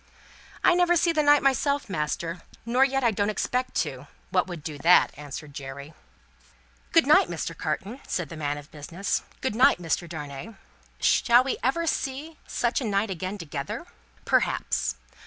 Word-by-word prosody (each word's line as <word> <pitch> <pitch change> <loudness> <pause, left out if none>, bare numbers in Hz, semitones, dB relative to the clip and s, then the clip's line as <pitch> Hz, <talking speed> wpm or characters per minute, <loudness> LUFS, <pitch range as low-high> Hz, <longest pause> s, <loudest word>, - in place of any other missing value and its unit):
"I 360 - +6
never 350 0 +4
see 340 +1 +3
the 310 -2 +2
night 290 -1 +5
myself, 280 +2 +1
master 165 0 -3 0.2
nor 245 +3 +3
yet 270 0 +1
I 235 - +4
don't 205 0 0
expect 250 +5 -1
to - - -8 0.2
what - - +2
would 175 -5 -7
do 150 -2 -6
that," 170 +5 +5
answered 145 +1 -8
Jerry. 140 +2 -8 1.0
"Good - - +5
night, - - +6
Mr. - - -4
Carton," 215 +8 -3
said 175 -5 -2
the - - -8
man 145 -2 -2
of 145 0 -11
business. 165 +6 -3 0.2
"Good 260 - -1
night, 255 -1 +5
Mr. 170 0 -2
Darnay. 150 +6 -7 0.4
Shall 240 +1 +5
we 265 - -2
ever 335 +7 +1
see 300 +1 -3
such 240 +3 0
a - - -2
night 200 0 0
again, 185 +3 -4
together!" 150 -6 -5 0.4
Perhaps. - - +1
200 Hz, 165 wpm, -26 LUFS, -, 1.0 s, I